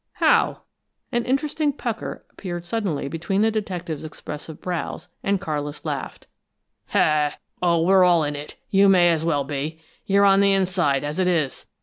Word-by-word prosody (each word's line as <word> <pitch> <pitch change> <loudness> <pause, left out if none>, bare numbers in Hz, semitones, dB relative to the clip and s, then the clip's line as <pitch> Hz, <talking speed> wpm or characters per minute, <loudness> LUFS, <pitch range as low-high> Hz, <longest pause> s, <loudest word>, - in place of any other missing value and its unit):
"How?" - - +3 0.5
An 240 -2 0
interested 290 +2 0
pucker 230 -3 -4
appeared 175 -3 -6
suddenly 175 -8 -2
between 180 +7 -1
the 220 - +3
detective's 180 -8 -4
expressive 155 0 -8
brows, 180 0 -4
and 200 0 +1
Carlis 150 -5 -4
laughed. - - -4 1.4
"Oh, 170 -2 +3
we're 190 +1 +5
all 175 -3 +5
in 145 0 -2
it 145 +1 -8 0.2
you 195 0 +5
may 175 -2 +6
as 160 -1 0
well 145 -4 +1
be! 145 +3 -4 0.3
You're 200 +1 +4
on 195 0 +6
the 200 0 +4
inside, 180 -8 +1
as 150 +4 -3
it 185 - +2
is! 160 -7 -1
175 Hz, 155 wpm, -23 LUFS, 155-200 Hz, 1.4 s, may